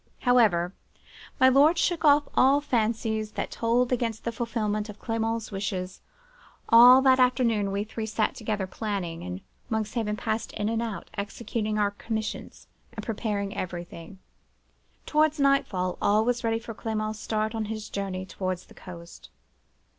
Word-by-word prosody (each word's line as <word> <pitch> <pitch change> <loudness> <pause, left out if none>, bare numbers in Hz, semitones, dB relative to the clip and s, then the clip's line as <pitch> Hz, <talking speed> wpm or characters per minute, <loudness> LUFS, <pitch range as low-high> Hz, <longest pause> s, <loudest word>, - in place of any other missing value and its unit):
"However, 210 -8 +3 0.7
my 260 - +7
lord 285 +6 +5
shook 340 -1 0
off 290 -1 +5
all 275 +2 +5
fancies 220 -4 -1
that - - -4
told 235 +2 +1
against 230 -3 -1
the 235 - -2
fulfilment 215 -2 -2
of 210 - -9
Clement's 225 0 -2
wishes. 190 -2 -4 0.7
All 245 +3 +9
that 260 -1 +5
afternoon 235 -5 +2
we 200 +1 -1
three 220 +1 -5
sat 215 0 0
together, 210 -3 -3
planning; 185 -4 -4
and 90 +1 -6 0.3
Monkshaven 215 -1 -2
passed 220 0 -3
in 210 +1 -2
and 225 0 -1
out, 225 -4 -5
executing 215 +1 -3
our 205 -1 +2
commissions, 220 +1 -5 0.3
and - - -7
preparing 205 -3 -3
everything. 175 0 -6 0.9
Towards 310 0 +2
nightfall 215 -10 +1
all 215 +2 +3
was 245 +1 0
ready 225 -1 +1
for 230 0 -7
Clement's 215 -1 -3
start 215 0 -2
on 220 -1 -2
his 215 0 -5
journey 190 -2 -4
towards 185 -1 -4
the - - -17
coast. 170 -2 -12
220 Hz, 145 wpm, -27 LUFS, 200-235 Hz, 0.9 s, All